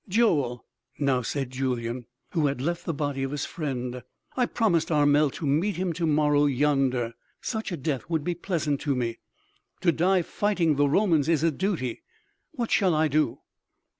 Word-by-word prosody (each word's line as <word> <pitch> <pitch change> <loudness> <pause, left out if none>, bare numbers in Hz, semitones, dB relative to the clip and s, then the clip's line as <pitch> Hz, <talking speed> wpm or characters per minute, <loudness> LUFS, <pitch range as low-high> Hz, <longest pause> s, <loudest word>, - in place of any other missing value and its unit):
"Joel," 150 - +2 0.3
now 135 -3 +1
said 135 +1 -3
Julyan, 125 -2 -2 0.2
who 160 -5 +2
had 140 -2 -2
left 170 +6 -2
the - - 0
body 145 -2 -2
of 135 - -1
his 145 0 -3
friend, 125 -5 -4 0.3
"I 250 -2 +2
promised 185 -9 +1
Armel 145 0 +4
to 160 - -5
meet 160 +9 +1
him 180 -1 -1
to 165 0 -1
morrow 150 -1 +3
yonder 135 -4 +1 0.3
Such 220 -3 -3
a 175 - -2
death 140 +1 -3
would 160 -3 0
be 175 +2 -1
pleasant 160 -5 -2
to 140 -3 0
me.... 120 -2 -2 0.6
To 180 -2 +4
die 180 +2 +2
fighting 175 -5 +1
the 145 0 +3
Romans 165 -4 +3
is 160 -2 +2
a 165 - +4
duty.... 155 - -2 0.5
What 235 -2 -3
shall 185 -5 +3
I 155 0 +2
do?" 150 +2 +1
150 Hz, 175 wpm, -26 LUFS, 135-170 Hz, 0.6 s, Armel